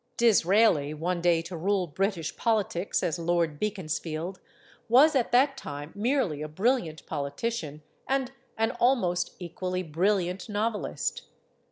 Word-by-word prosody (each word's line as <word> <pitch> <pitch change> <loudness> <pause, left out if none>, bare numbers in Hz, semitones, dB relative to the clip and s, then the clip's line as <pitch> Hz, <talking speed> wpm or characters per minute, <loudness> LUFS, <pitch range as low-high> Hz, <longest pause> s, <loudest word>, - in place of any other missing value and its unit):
Disraeli 195 -8 +4
one 170 +3 -2
day 170 -1 +3
to 170 +2 -7
rule 190 +3 +1
British 175 0 -2
politics 205 -5 0
as 170 0 -1
Lord 170 -3 0
Beaconsfield 180 -3 -3 0.5
was 280 +6 +6
at 250 -3 +1
that 270 +3 +4
time 145 - -7
merely 210 - 0
a 155 - -3
brilliant 175 - 0
poli 140 -2 -3
tician 155 -3 -4 0.3
and 265 -1 0 0.3
an 225 0 +1
almost 180 -9 +2
equally 180 +1 -4
brilliant 180 +4 0
novelist. 210 - -2
180 Hz, 130 wpm, -28 LUFS, 165-225 Hz, 0.5 s, was